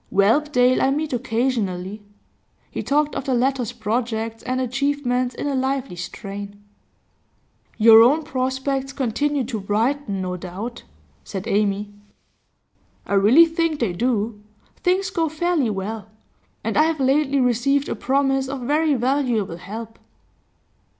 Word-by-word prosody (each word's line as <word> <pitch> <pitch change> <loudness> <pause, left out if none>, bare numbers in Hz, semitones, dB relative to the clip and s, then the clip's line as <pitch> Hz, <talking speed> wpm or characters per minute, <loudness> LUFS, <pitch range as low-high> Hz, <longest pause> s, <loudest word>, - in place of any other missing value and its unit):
Whelpdale 250 +5 +3
I 265 - +3
meet 295 +1 -1
occasionally.' 225 -6 -1 0.7
He - - -4
talked 295 +1 +1
of 275 - -4
the 265 -3 +1
latter's 250 -2 0
projects 225 -1 -2
and 255 0 -2
achievements 255 -1 -1
in - - -4
a 285 - -1
lively 265 -4 -1
strain. 200 +3 -7 1.2
'Your 225 0 +8
own 285 +7 +4
prospects 265 0 -2
continue 275 +3 0
to 230 -2 -4
brighten, 215 +2 -1
no 180 0 -3
doubt,' 190 +7 -7 0.4
said 195 +2 -6
Amy. 205 -1 0 1.1
'I - - -4
really 215 +12 +7
think 330 -2 -1
they 220 -7 0
do. 220 0 -1 0.4
Things 375 +1 0
go 330 -4 0
fairly 315 -4 0
well. 210 +1 -4 0.5
And - - -1
I 305 - +6
have 320 -1 -1
lately 275 +1 +2
received 260 +3 +2
a - - -2
promise 270 +3 +1
of 270 -1 -4
very 295 +4 +2
valuable 245 -8 0
help. 220 +5 -8
250 Hz, 130 wpm, -22 LUFS, 215-280 Hz, 1.2 s, Your